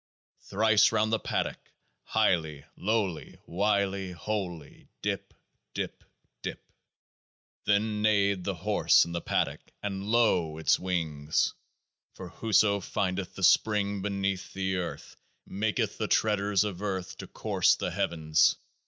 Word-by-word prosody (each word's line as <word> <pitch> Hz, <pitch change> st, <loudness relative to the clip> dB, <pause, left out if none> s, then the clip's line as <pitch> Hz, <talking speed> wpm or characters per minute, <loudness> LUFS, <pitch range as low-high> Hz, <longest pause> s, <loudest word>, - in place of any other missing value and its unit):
Thrice 105 Hz, +1 st, +4 dB
round 110 Hz, 0 st, +1 dB
the 110 Hz, -, +2 dB
paddock. -, -, -3 dB, 0.4 s
Highly, 80 Hz, -5 st, +1 dB
lowly, 100 Hz, -5 st, -2 dB
wily, 100 Hz, 0 st, 0 dB
holy, 90 Hz, -6 st, -5 dB, 0.2 s
dip, -, -, -2 dB, 0.4 s
dip, -, -, -4 dB, 0.4 s
dip! -, -, -5 dB, 1.1 s
Then 105 Hz, +1 st, +1 dB
neighed 100 Hz, -3 st, +2 dB
the 100 Hz, 0 st, -2 dB
horse 100 Hz, +5 st, +3 dB
in 85 Hz, -, -7 dB
the 85 Hz, 0 st, -3 dB
paddock -, -, -1 dB
— -, -, -47 dB
and 100 Hz, -1 st, -3 dB
lo! 95 Hz, -9 st, +2 dB
its 80 Hz, -, +2 dB
wings. 80 Hz, -5 st, -1 dB, 0.6 s
For 90 Hz, -, -8 dB
whoso 105 Hz, 0 st, +2 dB
findeth 95 Hz, 0 st, -3 dB
the 95 Hz, -, -6 dB
SPRING 100 Hz, +1 st, +3 dB
beneath 100 Hz, -1 st, -2 dB
the 95 Hz, -1 st, -1 dB
earth 90 Hz, -2 st, -5 dB, 0.3 s
maketh 105 Hz, +2 st, -2 dB
the -, -, -1 dB
treaders 105 Hz, -2 st, +2 dB
of 100 Hz, -3 st, -4 dB
earth 95 Hz, -3 st, -3 dB
to -, -, -7 dB
course -, -, +2 dB
the -, -, -3 dB
heavens. 80 Hz, -2 st, +2 dB
100 Hz, 125 wpm, -28 LUFS, 90-105 Hz, 1.1 s, Thrice